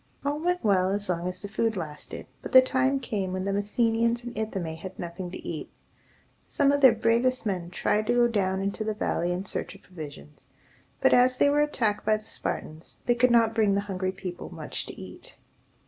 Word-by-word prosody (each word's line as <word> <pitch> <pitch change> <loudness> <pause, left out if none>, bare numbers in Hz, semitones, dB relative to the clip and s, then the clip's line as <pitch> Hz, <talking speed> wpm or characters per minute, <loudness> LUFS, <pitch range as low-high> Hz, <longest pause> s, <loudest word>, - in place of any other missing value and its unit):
All 290 +1 0
went 355 +2 0
well 190 -3 +3
as 205 0 -2
long 175 0 -1
as 180 +1 -6
the - - -4
food 220 +1 -1
lasted, 150 -4 -7 0.2
but - - -7
the 260 - +11
time 265 +1 +1
came 200 -8 -3
when 185 0 -2
the 200 - 0
Messenians 230 +3 +1
in 240 0 -6
Ithome 195 -8 -3
had 185 +3 -9
nothing 175 +1 -6
to 180 - -8
eat. 160 -3 -5 0.7
Some 280 -1 +2
of 285 0 +1
their 260 -4 +8
bravest 235 +3 +2
men 180 -4 -2
tried 210 +4 0
to 240 - +2
go 240 0 +5
down 190 -4 0
into 200 +2 -2
the 215 0 -2
valley 175 -4 -1
in 180 +2 -3
search - - -3
of - - -17
provisions; 145 - -11 0.5
but, - - +5
as 250 +1 +5
they 285 - +4
were 295 +1 +3
attacked 225 -8 0
by 215 0 +3
the 215 - -15
Spartans, 155 -5 -6
they 240 - +4
could 245 +1 +3
not 230 -2 +4
bring 215 -3 +3
the 200 - +1
hungry 190 -2 -2
people 185 -2 -7
much - - -4
to - - -8
eat. - - -10
210 Hz, 210 wpm, -27 LUFS, 185-240 Hz, 0.7 s, the